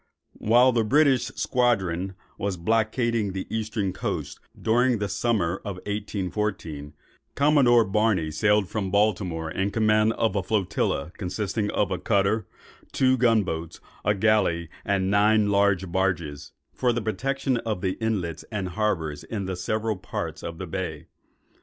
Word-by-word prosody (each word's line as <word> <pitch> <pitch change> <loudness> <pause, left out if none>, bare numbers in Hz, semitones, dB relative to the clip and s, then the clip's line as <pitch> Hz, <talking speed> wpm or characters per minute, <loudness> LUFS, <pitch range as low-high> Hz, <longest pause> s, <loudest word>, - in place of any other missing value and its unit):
While 120 +4 +5
the 115 -2 +2
British 135 +1 +3
squadron 95 -7 0 0.2
was 100 -2 -2
blockading 110 +2 0
the 95 - -4
eastern 110 -3 -2
coast - - -4 0.2
during 120 +2 +2
the 105 -1 -2
summer 95 -3 0
of 100 -1 -6
1814, 95 -6 -4 0.4
Commodore 140 -5 +5
Barney 100 -5 +1
sailed 105 +5 +2
from 100 -2 -3
Baltimore 90 -5 0
in 95 +4 -1
command 110 +1 +3
of 110 -3 0
a 100 - +1
flotilla 90 -6 -1
consisting 105 +2 -2
of 100 -2 0
a 95 - -1
cutter, 100 +1 +1 0.4
two 130 -1 +3
gun 115 -4 +3
boats, 80 -3 -5 0.2
a 105 +1 +2
galley, 95 -6 +2
and 95 -1 0
nine 105 0 +4
large 100 -3 +2
barges, 85 -6 -1 0.2
for 125 -1 +1
the 120 0 -1
protection 135 +3 -1
of 110 -5 -3
the 95 -1 0
inlets 100 -8 -2
and 100 -4 -2
harbours 80 -7 -1
in 100 -4 -4
the 95 0 -3
several 110 +4 -2
parts - - -5
of 85 -1 -6
the 95 - -5
bay. 85 -3 -5
105 Hz, 145 wpm, -25 LUFS, 95-110 Hz, 0.4 s, While